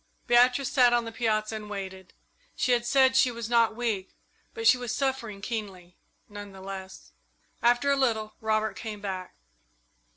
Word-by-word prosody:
Beatrice 245 +2 +4
sat 245 -3 +5
on 240 -1 +2
the 225 - -6
piazza 220 -1 -1
and 210 -1 -7
waited. 190 -2 -7 0.4
She 255 - 0
had 240 -1 +1
said 260 0 +4
she 260 -1 +5
was 235 -2 -5
not 230 -2 +3
weak, 220 -5 -3 0.4
but 450 0 -5
she 255 - +7
was 245 -2 -4
suffering 255 -7 -2
keenly, 195 -6 -6 0.3
none 205 -1 -9
the 190 - -12
less. 190 0 -9 0.5
After 245 +4 +3
a - - +4
little 225 -5 0
Robert 215 -2 0
came 215 +1 -6
back. 190 -3 -6
225 Hz, 165 wpm, -27 LUFS, 200-245 Hz, 0.5 s, she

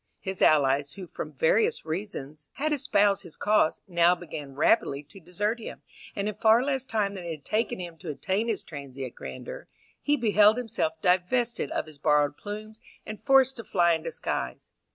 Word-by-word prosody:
His 190 -1 -5
allies, 140 -1 +4
who 195 -2 -8
from - - -7
various 485 -1 +2
reasons 155 -4 -6
had 305 +2 -1
espoused 205 -8 +2
his 175 -5 -12
cause, 210 -6 +2
now 175 -1 +4
began 150 -5 -8
rapidly 145 -2 +2
to 150 +7 -15
desert 205 +7 -2
him, 225 - -9 0.3
and 200 0 -2
in 210 - -2
far 220 +3 +4
less 270 -2 -1
time 210 -5 0
than 190 -3 -7
it - - -5
had 155 -3 -7
taken 215 -2 -1
him 170 -2 -7
to 170 - -7
attain 190 - -1
his 220 -4 -1
transient 135 -4 -7
grandeur, - - -8 0.3
he 295 0 +2
beheld 215 -2 +5
himself 210 -10 -2
divested 210 +7 +1
of - - -2
his 155 -2 -13
borrowed 150 -1 +2
plumes, 215 +3 -8 0.2
and 215 -1 -7
forced 265 +2 +4
to 230 - -6
fly 175 -4 +3
in 160 - -1
disguise. 60 - -4
195 Hz, 180 wpm, -27 LUFS, 155-225 Hz, 0.3 s, beheld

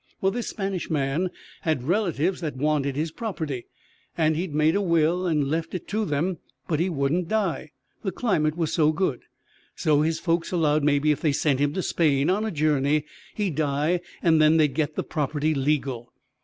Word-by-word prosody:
Well, 195 - +2
this 240 +3 -3
Spanish 195 -3 -3
man 150 +4 0 0.3
had 155 -6 0
relatives 180 - 0
that 155 -4 -3
wanted 145 -1 0
his 155 +2 -2
property, 160 - -4 0.5
and 155 -1 +2
he'd 170 +1 -2
made 155 +3 +2
a 200 - +2
will 170 0 +2
and 150 -4 +1
left 160 +5 -2
it 180 - -5
to 215 +1 0
them; 165 +2 -1 0.3
but 155 -3 0
he 175 +3 +1
wouldn't 160 +3 0
die, 190 -7 -1 0.3
the 195 - -2
climate 165 -7 0
was 165 -3 -1
so 155 -2 +4
good. 155 -6 -1 0.5
So 150 -1 +2
his 160 +1 +1
folks 170 -1 0
allowed 155 -4 +2
maybe 150 +1 +3
if 150 - -1
they 155 - +2
sent 140 -1 +1
him 145 0 +1
to 185 - -2
Spain 150 -1 +2
on 210 +3 0
a - - -1
journey 150 -3 +1 0.3
he'd 200 -6 -1
die 155 +3 +1 0.2
and 160 -2 +4
then 155 +1 +5
they'd 150 -4 +3
get 155 -1 -1
the - - -1
property 150 +1 -1
legal. 135 -4 -1
155 Hz, 190 wpm, -25 LUFS, 145-175 Hz, 0.5 s, then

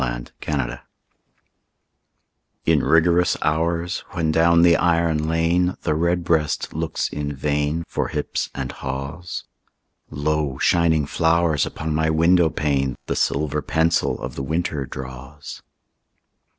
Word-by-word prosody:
XVII—WINTER - - -3 1.8
In 80 -3 +3
rigorous 85 +2 +3
hours, 85 +3 0
when 80 -3 0
down 85 +1 +4
the 85 -1 +6
iron 85 -3 +1
lane 85 +3 +1
The - - +1
redbreast 85 -1 0
looks 80 0 -2
in 75 -1 -4
vain 75 +3 -1
For - - -2
hips - - -3
and 65 -1 -4
haws, 70 +6 -5 0.7
Lo, 75 -2 -1
shining 80 -2 +2
flowers 80 0 +2
upon 80 0 -4
my 80 +1 +1
window 85 +2 +4
pane 70 -4 -1
The - - -2
silver 75 +2 0
pencil 80 +4 +1
of - - -5
the - - -5
winter 75 -1 -2
draws. 65 +3 -9
80 Hz, 115 wpm, -22 LUFS, 70-85 Hz, 1.8 s, the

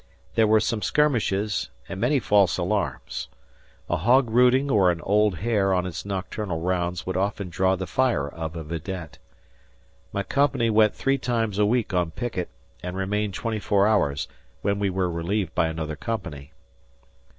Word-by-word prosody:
There 110 -1 +4
were 110 +1 +5
some 110 0 -1
skirmishes 110 -9 +1 0.2
and 95 0 -6
many 145 -2 +3
false 100 -6 +3
alarms. - - -2 0.6
A - - 0
hog 120 - +3
rooting 125 +4 +4
or 95 -5 +5
an 85 -1 0
old 105 0 +2
hare 100 0 +1
on 90 0 0
its 90 +2 -5
nocturnal 95 -2 -3
rounds 90 0 -1
would 95 - -3
often 100 0 -1
draw 95 +2 +2
the 95 0 -4
fire 120 - +1
of 80 +2 -6
a 80 - -5
vidette. 85 +1 -6 0.9
My 100 - -2
company 130 -4 +1
went 110 -1 +4
three 135 0 +1
times 115 -5 -1
a 105 - +4
week 115 -2 0
on 90 -2 +1
picket 100 -1 -4 0.3
and 90 +1 -5
remained 100 +1 -1
twenty 115 -2 -2
four 100 -1 +2
hours, 100 -10 +1 0.4
when 100 0 +1
we 100 -1 +1
were 95 -1 0
relieved 85 +2 -2
by 80 - +2
another 80 -1 -4
company. 80 - -5
100 Hz, 165 wpm, -25 LUFS, 90-110 Hz, 0.9 s, were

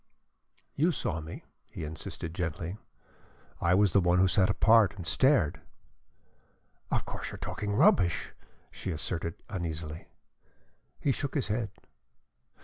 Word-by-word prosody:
"You 165 +5 +2
saw 80 - -2
me," 80 +1 -8 0.3
he - - -7
insisted 80 +1 -6
gently. 90 +3 -3 0.8
"I 85 +1 +4
was 100 -2 +4
the 100 - +5
one 90 0 +3
who 95 +1 +5
sat 95 +2 +3
apart 105 0 +5
and 90 -4 -7
stared." 90 - +3 1.3
"Of - - 0
course - - -5
you - - -7
are - - -8
talking 105 -1 -3
rubbish!" 90 -4 +3 0.4
she - - -6
asserted, 85 0 -2
uneasily. 80 -4 -5 0.9
He 140 - +1
shook 140 +3 -3
his 135 -7 0
head. 110 0 -1
90 Hz, 135 wpm, -30 LUFS, 80-105 Hz, 1.3 s, the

